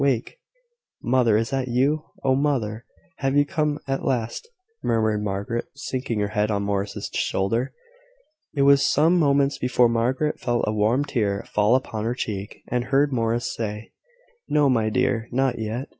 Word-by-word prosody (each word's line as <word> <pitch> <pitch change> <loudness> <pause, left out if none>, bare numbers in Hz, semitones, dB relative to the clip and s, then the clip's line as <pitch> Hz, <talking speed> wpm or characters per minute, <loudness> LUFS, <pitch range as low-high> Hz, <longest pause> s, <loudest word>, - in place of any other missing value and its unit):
Wake!" 135 - 0 0.6
"Mother! 120 -3 +3
is 115 +4 -1
it 135 -1 0
you? 135 +6 +1 0.2
Oh, 135 -1 +3
mother! 125 -6 -1 0.3
have 135 +1 0
you 145 - +5
come 150 0 -1
at 135 0 -2
last?" 125 - -2 0.3
murmured 110 -2 +1
Margaret, 100 +4 -2
sinking 130 -5 -3
her 100 - 0
head 105 0 0
on 100 -1 0
Morris' 100 0 -3
shoulder. 115 +7 0 0.8
It 140 - +2
was 140 0 +6
some 160 +5 +3
moments 140 -2 +2
before 125 -1 +3
Margaret 125 +6 0
felt 120 -1 0
a 105 - -1
warm 110 +7 +2
tear 105 -8 -1
fall 105 +3 +4
upon 110 -4 -2
her 120 +2 -1
cheek, 105 -4 -5
and 125 0 -1
heard 140 +1 +2
Morris 115 0 0
say: 105 -1 -5 0.6
"No, 150 -2 +3
my 110 -3 +2
dear: 120 -1 0
not 130 -1 +1
yet. 110 +5 -3
120 Hz, 160 wpm, -24 LUFS, 110-135 Hz, 0.8 s, was